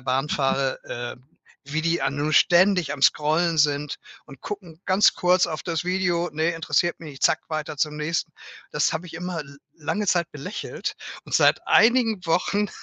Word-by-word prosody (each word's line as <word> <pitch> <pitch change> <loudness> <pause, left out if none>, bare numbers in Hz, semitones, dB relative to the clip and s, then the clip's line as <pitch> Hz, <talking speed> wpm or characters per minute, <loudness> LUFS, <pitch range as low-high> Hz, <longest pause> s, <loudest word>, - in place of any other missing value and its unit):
Bahn 130 +3 -1
fahre, 135 -1 0
äh, 120 0 -6 0.5
wie 155 +2 -2
die 170 +1 +1
a - - +1
nu 145 +2 -2
ständig 180 -1 +4
am 140 - -7
Scrollen 160 +3 +3
sind 145 -1 +1 0.3
und 135 -3 -14
gucken 180 -6 -8
ganz 190 +2 +5
kurz 180 0 +3
auf 155 - -5
das 165 -3 -2
Video: 175 -2 0
„Ne, 160 +2 +1
interessiert 165 +1 0
mich 155 -3 -8
nicht, 135 - -13
zack, - - +3
weiter 155 -1 -4
zum 150 +1 -1
nächsten.“ 160 +1 -2 0.4
Das 150 - +1
habe 165 +3 -4
ich 170 - -11
immer 175 0 -4
l 140 -1 -12 0.2
lange 170 +7 -3
Zeit 170 -3 +1
belächelt 145 +8 -5 0.3
und - - -6
seit - - +3
einigen 225 -4 +4
Wochen 195 +5 +1
160 Hz, 180 wpm, -24 LUFS, 150-180 Hz, 0.5 s, ganz